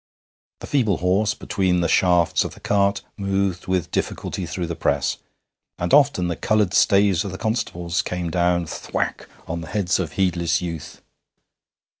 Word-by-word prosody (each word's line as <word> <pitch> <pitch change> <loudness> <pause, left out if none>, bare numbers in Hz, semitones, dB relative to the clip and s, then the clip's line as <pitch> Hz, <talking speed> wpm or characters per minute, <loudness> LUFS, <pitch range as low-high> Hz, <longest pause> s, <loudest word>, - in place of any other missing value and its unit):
The - - -6
feeble 110 - +1
horse 100 +4 +1
between 95 -3 0
the 85 - +1
shafts 90 -1 +3
of - - -6
the - - -14
cart 100 0 +1
moved 100 -2 -1
with 95 -2 -1
difficulty 90 - -3
through 85 +2 -3
the 85 0 -4
press, - - 0 0.6
and 85 0 -2
often 140 -11 +4
the 85 - -2
coloured 105 -1 +1
staves 100 -3 +4
of 100 - -5
the 95 - -6
constables 90 -6 -1
came 90 -2 -3
down 85 0 +1
thwack - - -4 0.2
on 85 +1 -3
the 80 - -8
heads 90 +1 0
of 90 -4 -3
heedless 85 -3 +1
youth. 85 -4 -7
90 Hz, 160 wpm, -22 LUFS, 85-100 Hz, 0.6 s, often